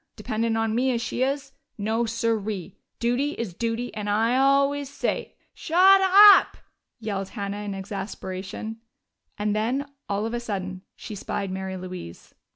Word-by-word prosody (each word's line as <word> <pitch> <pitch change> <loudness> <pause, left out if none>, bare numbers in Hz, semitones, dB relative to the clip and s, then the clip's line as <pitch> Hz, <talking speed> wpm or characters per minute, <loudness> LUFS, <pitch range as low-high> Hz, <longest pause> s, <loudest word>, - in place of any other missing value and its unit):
Dependin' 225 0 -1
on 225 -1 0
me 250 +3 +2
as 240 -2 +1
she 235 +1 -3
is. 275 +1 -1 0.3
No, 225 +3 0
siree! 220 -4 -2 0.2
Duty 250 +5 0
is 225 -6 -5
duty, 230 +4 -3
and 210 -1 -4
I 225 +4 +2
always 275 +1 +3
say 280 - -3
" - - -43
"Shut 380 +4 +5
up!" 400 +2 +8 0.4
yelled 200 -3 -3
Hannah 200 -2 -4
in 205 -1 -4
exasperation. 195 +1 -6 0.6
And 210 0 0
then, 245 +6 0 0.2
all 205 +1 -1
of 225 - -3
a 240 - -1
sudden, 190 -5 -4
she - - -8
spied 195 -1 -4
Mary 190 0 -4
Louise. 180 - -9
225 Hz, 155 wpm, -25 LUFS, 200-255 Hz, 0.6 s, up